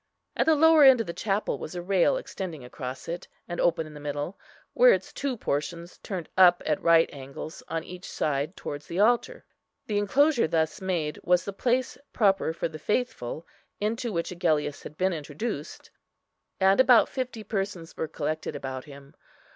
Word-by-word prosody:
At - - +1
the 320 - +6
lower 320 0 +6
end 265 -3 +8
of 225 - -1
the 170 - -5
chapel 205 +1 -1
was - - -7
a 175 - -3
rail 195 - +3
extending 175 - -6
across 125 +1 -7
it, 170 +1 -5 0.2
and 175 - -3
open 165 -2 +2
in 155 - -11
the 150 - -9
middle, 145 +5 -4 0.4
where - - +7
its - - -3
two 275 -3 -2
portions 170 +2 -3
turned 185 -5 -5
up 180 -1 +6
at 155 -2 0
right 165 -1 +5
angles 140 +3 -8
on 165 0 -3
each 180 +2 -9
side 150 +4 -2
towards 145 0 -6
the 175 - -4
altar. 240 - +2 0.4
The 205 -2 0
enclosure 265 - +3
thus 160 +4 0
made 170 -5 -2
was 180 0 +3
the 200 - -4
place 250 +5 0
proper 195 -7 +2
for 165 - -2
the 155 -1 -9
faithful, 170 - -2 0.3
into 230 +3 -1
which 170 -2 -2
Agellius 155 -5 0
had 150 - -10
been 185 0 +1
introduced, 155 +2 -5 0.7
and 190 +2 +4
about 250 -3 +6
fifty 255 -4 -4
persons 195 -6 -4
were 160 - -3
collected 155 0 -3
about 130 -2 -5
him. 140 -1 -13
175 Hz, 180 wpm, -27 LUFS, 155-215 Hz, 0.7 s, end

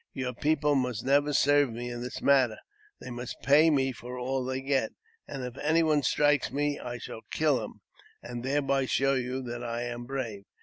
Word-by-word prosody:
Your 130 -2 -3
people 150 +3 +1
must 125 -5 -1
never 145 +2 +3
serve 145 -2 +4
me 120 +2 -5
in 120 0 -5
that 125 0 -6
manner; 130 -5 +4 0.4
they - - -8
must 120 0 -6
pay 150 +4 +6
me 135 -3 +2
for 125 +1 -8
all 130 +1 -1
they 130 +1 -2
get; 135 0 0 0.3
and 135 -2 -6
if 125 -1 -6
any 160 +2 +3
one 155 -2 +3
strikes 145 +2 +2
me, 145 +1 -1
I 120 0 -5
shall 115 - -8
kill 145 -7 +1
him, - - -10 0.4
and 120 0 -6
thereby 135 0 +1
show 135 +1 +2
you 130 0 -2
that 120 0 -5
I 120 0 -3
am 120 0 -5
brave. 120 -7 -5
130 Hz, 200 wpm, -29 LUFS, 120-145 Hz, 0.4 s, pay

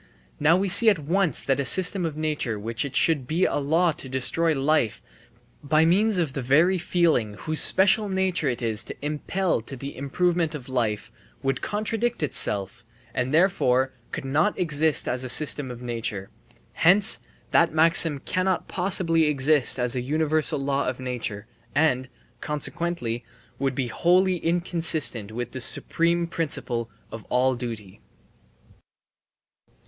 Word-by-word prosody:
Now 165 +3 +4
we 195 +1 -1
see 200 +5 +6
at 200 - +2
once 165 +1 -1
that 135 0 0
a - - 0
system 180 +4 +4
of 155 -2 -7
nature 150 -7 -2
of 105 - -9
which 115 +3 -2
it 140 -1 -7
should 150 -4 +2
be 170 +4 +1
a - - -1
law 160 +5 +1
to 150 -4 -9
destroy 135 +6 +1
life 140 -5 0 0.6
by 155 +2 +2
means 200 +5 +2
of 160 -6 -1
the 135 - -4
very 160 +9 +2
feeling 160 - 0
whose 155 +8 -2
special 200 +2 +3
nature 190 -6 -1
it 125 -1 -4
is 110 -2 0
to - - -8
impel 160 +2 -2
to 135 +5 -9
the 140 +3 -8
improvement 165 +4 -1
of 135 -3 -9
life 120 -3 -2 0.3
would 135 +1 -1
contradict 220 0 -2
itself 105 -5 -1 0.3
and, 125 +1 -2
therefore, 130 -7 +2 0.2
could - - -6
not 155 +10 0
exist 160 -3 +1
as 125 +1 -2
a 130 - -4
system 145 +1 +3
of 125 0 -9
nature; 115 -5 -5 0.4
hence 195 +4 +4 0.3
that 165 -1 +3
maxim 160 -1 +4
cannot 185 +6 -2
possibly 175 -3 +2
exist 145 -2 +3
as 125 0 0
a 125 - -2
universal 155 +3 0
law 140 0 -1
of 125 0 -3
nature 120 -5 -5 0.3
and, 135 -4 +1 0.3
consequently, 150 -5 -4 0.4
would 135 -1 -1
be 135 - -1
wholly 180 +9 +1
inconsistent 165 - 0
with 120 +2 -5
the 130 - -6
supreme 170 +7 0
principle 145 -8 -4 0.2
of 110 - -8
all 130 +1 +1
duty. 115 -6 -7
150 Hz, 155 wpm, -24 LUFS, 125-170 Hz, 0.6 s, see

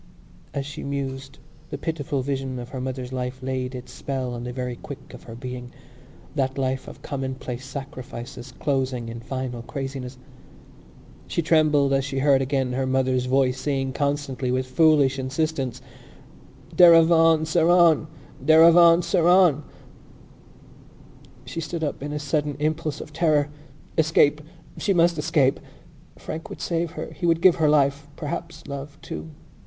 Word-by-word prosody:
As 140 -1 -3
she 145 - -7
mused 135 -1 -5 0.3
the - - -4
pitiful 145 -2 -3
vision 135 -1 -3
of 120 0 -7
her 130 -1 -5
mother's 130 -1 -5
life 130 0 -4
laid 130 0 -3
its 125 0 -8
spell 130 -3 -4
on 120 0 -6
the 125 - -4
very 125 -1 -4
quick 140 +3 -10
of - - -10
her 115 - -9
being—that 130 +2 -7
life 130 -1 -2
of - - -11
commonplace 130 -2 -5
sacrifices 130 -2 -8
closing 130 -4 -2
in 115 0 -7
final 125 0 -5
craziness. 135 0 -6 1.1
She 170 - -1
trembled 150 -4 +3
as 135 0 +2
she 135 0 -4
heard 135 0 +4
again 135 -1 -1
her 130 +1 -1
mother's 130 -1 +1
voice 130 0 +2
saying 135 -2 -1
constantly 140 -3 -2
with 130 +1 0
foolish 140 0 +3
insistence: 135 -1 -2 0.9
"Derevaun 165 -2 +6
Seraun! 165 -1 +4 0.4
Derevaun 165 +3 +7
Seraun!" 175 -4 +4 1.8
She 165 - -5
stood 160 +1 -4
up 145 - -3
in 145 +1 -4
a 150 - -3
sudden 145 0 -1
impulse 155 0 -2
of 150 - -10
terror. 150 -3 +2 0.5
Escape! 155 -2 +3 0.4
She 195 - +1
must 170 -1 +3
escape! 150 -4 +2 0.6
Frank 160 +2 -7
would - - -8
save 165 -1 -2
her. - - -6
He 175 - -2
would 165 -1 +3
give 180 0 +5
her 155 -3 +3
life, 145 -1 +2
perhaps 165 +1 -6
love, 140 +2 -7
too. 160 - -7
140 Hz, 145 wpm, -24 LUFS, 130-155 Hz, 1.8 s, Derevaun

